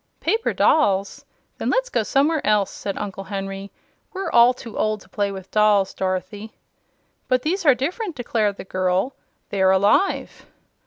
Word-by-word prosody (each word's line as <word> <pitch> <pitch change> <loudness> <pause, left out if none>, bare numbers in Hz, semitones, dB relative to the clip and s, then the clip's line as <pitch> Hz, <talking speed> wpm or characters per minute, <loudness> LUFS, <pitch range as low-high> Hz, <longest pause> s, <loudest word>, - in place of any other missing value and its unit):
"Paper 455 +1 0
dolls! 200 -10 +2 0.4
Then - - -1
let's - - +1
go - - +1
somewhere 295 +3 +1
else," 205 -2 +2
said 200 - -5
Uncle 195 -1 -5
Henry. 195 0 -5 0.4
"We're 385 0 -4
all 235 +1 +6
too 235 -3 -10
old 215 0 0
to - - -19
play 205 -1 -1
with 190 -1 -9
dolls, 210 -2 +3
Dorothy." 195 +3 -4 0.7
"But 255 -1 +1
these 345 +2 -1
are 275 - +7
different," 345 - -3
declared 220 -5 -1
the - - -7
girl. 185 +6 -1 0.4
"They're 190 -1 +3
alive." 200 - +1
210 Hz, 155 wpm, -22 LUFS, 195-275 Hz, 0.7 s, are